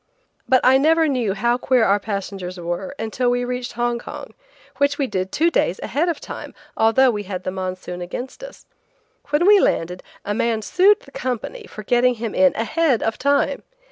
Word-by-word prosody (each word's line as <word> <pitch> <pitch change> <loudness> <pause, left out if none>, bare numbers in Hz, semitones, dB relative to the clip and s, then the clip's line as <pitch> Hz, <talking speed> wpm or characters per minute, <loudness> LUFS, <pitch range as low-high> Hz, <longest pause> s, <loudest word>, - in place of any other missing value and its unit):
But 260 0 +5
I 260 +1 +6
never 320 +2 +4
knew 240 -8 0
how 240 +4 +1
queer 255 -2 +2
our 200 0 +3
passengers 195 -3 -5
were 175 +7 -4
until 230 +3 -1
we 245 0 0
reached 250 0 -4
Hong 240 0 -1
Kong, - - -9 0.4
which 285 0 +1
we 280 - +1
did 190 -6 -3
two 335 +2 +2
days - - +1
ahead 330 +5 0
of 330 - -2
time, - - -8 0.2
although 235 +4 +4
we 210 -2 -3
had 185 -2 -6
the 185 - -3
monsoon 185 -1 -5
against 245 - -7
us. - - -11 0.6
When 295 +4 +2
we 410 +1 +7
landed, 180 - 0 0.2
a 205 - -1
man 225 0 0
sued 400 - +4
the 275 - -17
company 260 - -4
for 215 - -9
getting 245 +3 +3
him 230 -1 -4
in 280 -1 +4
ahead 275 +2 +1
of 225 - -2
time. 280 0 +1
245 Hz, 190 wpm, -21 LUFS, 205-280 Hz, 0.6 s, we